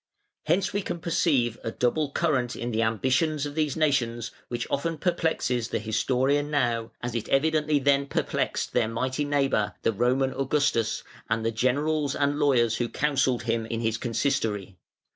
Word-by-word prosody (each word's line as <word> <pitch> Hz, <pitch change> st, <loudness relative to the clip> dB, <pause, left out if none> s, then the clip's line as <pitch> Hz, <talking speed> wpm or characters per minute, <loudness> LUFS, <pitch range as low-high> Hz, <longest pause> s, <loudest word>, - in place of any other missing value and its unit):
Hence 185 Hz, +5 st, +1 dB
we 205 Hz, -, 0 dB
can 180 Hz, -, -4 dB
perceive 145 Hz, -8 st, +1 dB
a -, -, -2 dB
double 135 Hz, +6 st, 0 dB
current 135 Hz, -6 st, 0 dB
in 120 Hz, +1 st, -4 dB
the 110 Hz, 0 st, 0 dB
ambitions 130 Hz, +7 st, +1 dB
of 145 Hz, -, -5 dB
these 150 Hz, -2 st, -1 dB
nations 120 Hz, -7 st, 0 dB, 0.2 s
which 120 Hz, -1 st, -3 dB
often 165 Hz, +3 st, -1 dB
perplexes 160 Hz, -9 st, 0 dB
the -, -, -2 dB
historian 130 Hz, +6 st, +1 dB
now, 120 Hz, -6 st, 0 dB
as 120 Hz, -1 st, -3 dB
it 115 Hz, -2 st, -3 dB
evidently 155 Hz, +1 st, +2 dB
then 140 Hz, 0 st, +2 dB
perplexed -, -, -1 dB
their -, -, +2 dB
mighty 130 Hz, +5 st, -2 dB
neighbour, 135 Hz, -7 st, +1 dB
the 115 Hz, -, +2 dB
Roman 130 Hz, +5 st, +1 dB
Augustus, 135 Hz, -5 st, 0 dB, 0.3 s
and 115 Hz, 0 st, 0 dB
the 115 Hz, -, +1 dB
generals 140 Hz, +5 st, 0 dB
and 145 Hz, +1 st, 0 dB
lawyers 120 Hz, -6 st, +3 dB
who 120 Hz, -1 st, -1 dB
counselled 135 Hz, -4 st, +1 dB
him 115 Hz, -1 st, -1 dB
in 115 Hz, 0 st, -3 dB
his 115 Hz, -1 st, -1 dB
consistory. 115 Hz, -6 st, -1 dB
130 Hz, 160 wpm, -26 LUFS, 115-145 Hz, 0.3 s, lawyers